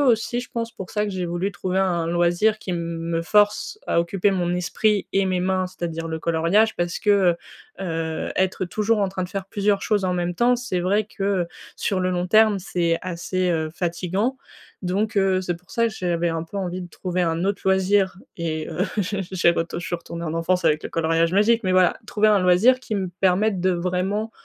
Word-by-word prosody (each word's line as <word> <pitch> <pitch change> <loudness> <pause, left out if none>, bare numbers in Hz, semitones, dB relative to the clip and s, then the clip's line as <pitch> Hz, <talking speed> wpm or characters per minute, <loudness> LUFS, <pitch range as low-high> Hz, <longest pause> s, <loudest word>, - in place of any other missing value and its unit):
aussi 240 -2 +2
je 250 - -9
pense, 230 -1 -3
pour 190 - -8
ça 210 0 0
que 210 - -3
j'ai 185 -2 -3
voulu 175 +4 -2
trouver 185 +1 -2
un 190 -1 +2
un 165 - -2
loisir 175 +5 +2
qui 190 - -6
m 175 - -1
me 165 0 -3
force 210 - +2
à - - +2
occuper 190 +3 +1
mon 175 -2 0
esprit 200 +3 +1
et 195 0 +2
mes 185 -1 0
mains, 185 0 0
c'est-à-dire 165 -3 -5
le 160 0 -3
coloriage 170 +7 +2
parce 175 -1 -1
que, 210 - +1 0.7
heu - - -3
heu, 160 -2 -3
être 185 0 +1
toujours 215 0 +1
en 195 - +2
train 185 -1 -3
de - - -7
faire 195 -1 -5
plusieurs 200 -1 0
choses 205 -2 +1
en 180 -1 0
même 175 0 -1
temps, 240 +6 +3
c'est 245 -7 -2
vrai 200 +4 +1
que, 205 -1 -9
heu, 190 -3 +1 0.3
sur 195 - -1
le 185 0 0
long 180 0 -1
terme, 215 0 +5
c'est 170 -3 0
assez, 185 +1 -2
heu, 160 -2 0
fatiguant. 185 +8 -1 0.5
Donc 205 +4 -1
heu, 190 -1 +3
c'est 175 -2 -2
pour 180 +1 -23
ça 230 -1 +1
que - - -8
j'avais 175 -4 -1
un 165 0 -2
peu 200 - -9
envie 185 -1 -3
de 175 - -7
trouver 180 +1 -2
un 165 +1 0
autre 200 0 -1
loisir 190 0 +2 0.2
et 160 -2 -3
heu, 180 +4 -1
j'ai 200 0 -1
j'ai 180 -2 +3
retou, 170 0 -2
je 175 - -6
suis 175 - -2
retournée 170 0 -7
en 155 - -3
enfance 175 +2 0
avec 155 -1 +3
le - - -3
coloriage 165 +1 +1
magique. 225 +4 +3
Mais 185 - +1
voilà, 185 -1 +4
trouver 215 0 +2
un 210 -1 +5
loisir 190 +9 +4
qui 220 -4 -4
me 190 -2 -1
permette 195 +1 +2
de, 185 +1 +2
vraiment, 185 +5 -1
185 Hz, 225 wpm, -23 LUFS, 170-205 Hz, 0.7 s, terme